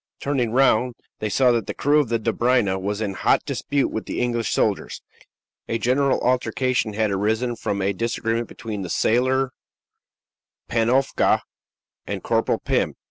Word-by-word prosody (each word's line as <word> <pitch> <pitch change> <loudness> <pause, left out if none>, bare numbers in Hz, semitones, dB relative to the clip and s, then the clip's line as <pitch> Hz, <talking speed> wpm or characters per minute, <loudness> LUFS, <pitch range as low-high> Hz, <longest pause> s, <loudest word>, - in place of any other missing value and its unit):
Turning 135 -5 0
round, 125 -1 +3 0.2
they 110 - -2
saw 125 +4 +4
that 115 -4 0
the - - -4
crew 145 +2 +3
of 140 -6 0
the 115 - +2
Dobryna 115 -3 +1
was 100 +2 -2
in 100 -3 -2
hot - - +2
dispute 140 -1 -1
with 110 - -4
the - - -3
English 120 -3 0
soldiers. - - 0 0.7
A 115 - -1
general 130 +4 +2
altercation 125 -2 0
had 110 0 0
arisen 110 +5 0
from 100 -3 -2
a 100 +1 +1
disagreement 115 +2 -2
between 110 -5 -6
the 90 - -5
sailor 130 +6 +2 1.2
Panofka 120 +4 +2 0.7
and - - -4
Corporal - - +1
Pim. - - -1
120 Hz, 150 wpm, -23 LUFS, 110-130 Hz, 1.2 s, saw